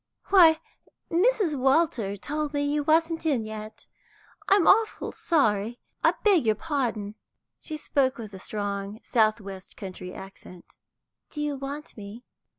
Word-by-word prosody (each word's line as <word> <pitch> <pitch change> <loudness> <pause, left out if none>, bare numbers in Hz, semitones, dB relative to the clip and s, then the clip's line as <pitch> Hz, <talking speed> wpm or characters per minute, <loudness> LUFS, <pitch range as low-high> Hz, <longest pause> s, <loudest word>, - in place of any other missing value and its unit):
"Why, 330 -5 +7 0.5
Mrs. 385 -1 +3
Walter 265 -6 +1
told 295 +6 -3
me 285 - +1
you 295 +1 0
wasn't 325 +2 +2
in 280 -8 +1
yet; 215 0 -8 0.6
I'm 395 -3 +5
awful 440 +2 +3
sorry, 230 - +1 0.2
I - - +4
beg 395 -8 +5
your 215 - +4
pardon." 235 -10 -2 0.5
She 310 - -6
spoke 275 -3 0
with 215 -3 -8
a 190 - -8
strong 200 +1 -4
south 220 -2 +2
west 195 -2 -10
country 185 -2 -7
accent. 190 -2 -12 0.5
"Do 300 - -8
you 295 -1 -1
want 280 +3 -7
me?" 210 +3 -10
265 Hz, 140 wpm, -26 LUFS, 210-315 Hz, 0.6 s, Why